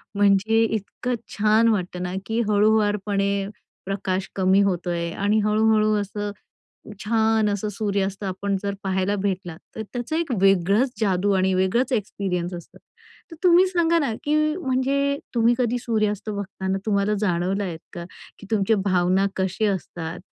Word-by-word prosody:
म्हणजे 205 +3 +3
इतकं 225 +3 -2 0.2
छान 215 +2 +4
वाटतं 180 -4 -1
ना 180 0 -4
की 225 +1 -1
हळूवारपणे 205 -2 +1 0.4
प्रकाश 190 -1 -2
कमी 190 +1 +3
होतोय 175 -3 -1
आणि 205 +4 +1
हळूहळू 215 0 +3
असं 205 +1 -4 0.7
छान 220 -1 +2
असं 205 +1 -2
सूर्यास्त 200 -1 -2
आपण 195 +1 -2
जर 200 -1 -2
पाहायला 190 0 0
भेटला, 185 -4 -3 0.2
तर 220 - -4
त्याचं 245 +5 -3
एक 330 -2 -2
वेगळंच 195 +6 +3
जादू 200 -1 +1
आणि 190 0 +2
वेगळंच 190 +9 +1
एक्सपिरियन्स 190 -5 -2
असतं. 175 -1 -11 0.5
तर 330 - -10
तुम्ही 360 +1 +6
सांगा 340 -2 +2
ना 280 -8 0
की 295 - +1 0.2
म्हणजे 280 -2 0 0.2
तुम्ही 235 0 +4
कधी 245 -1 +1
सूर्यास्त 215 -3 -1
बघताना 195 -1 -3
तुम्हाला 205 0 +1
जाणवलं 190 0 0
आहेत 170 -4 -5
का? 175 - -6 0.3
की 200 - -12
तुमच्या 220 0 +2
भावना 185 0 +2
कसे 190 +3 0
असतात? 175 -3 -4
205 Hz, 140 wpm, -23 LUFS, 190-220 Hz, 0.7 s, तुम्ही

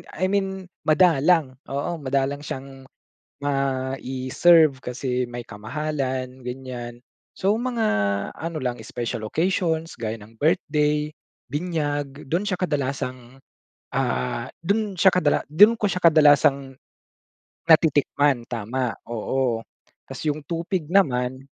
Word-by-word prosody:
I 185 +3 0
mean 190 -1 -1 0.2
madalang, 155 -4 +3
oo 150 +5 -3
madalang 140 +1 -1
siyang 135 -2 -8 0.6
mai-serve 135 +2 +2
kasi 125 0 -2
may 120 0 -6
kamahalan, 130 +3 -4
ganyan. 125 -1 -7 0.3
So, 195 +1 +1
mga 240 -3 -1 0.5
ano 165 0 -5
lang 125 -1 -2
special 115 -2 -4
occasions 165 - -1
gaya 110 -1 -2
ng 110 +1 -15
birthday, 150 -2 +1 0.4
binyag 145 -3 -2
do'n 170 - +2
siya 185 -3 0
kadalasang, 130 -5 -3 0.5
ah, 65 - -1 0.2
do'n 200 +2 0
siya 190 +2 +6
kadala 155 -5 +2
do'n 210 +9 +7
ko 210 -3 0
siya 180 - -2
kadalasang 145 -4 +5 0.9
natitikman 145 -5 +3
tama, 120 +2 -2
oo. 120 +1 -1 0.5
Tapos - - -7
yung 150 0 0
tupig 170 -1 -2
naman, 130 -8 +1
140 Hz, 110 wpm, -24 LUFS, 130-165 Hz, 0.9 s, do'n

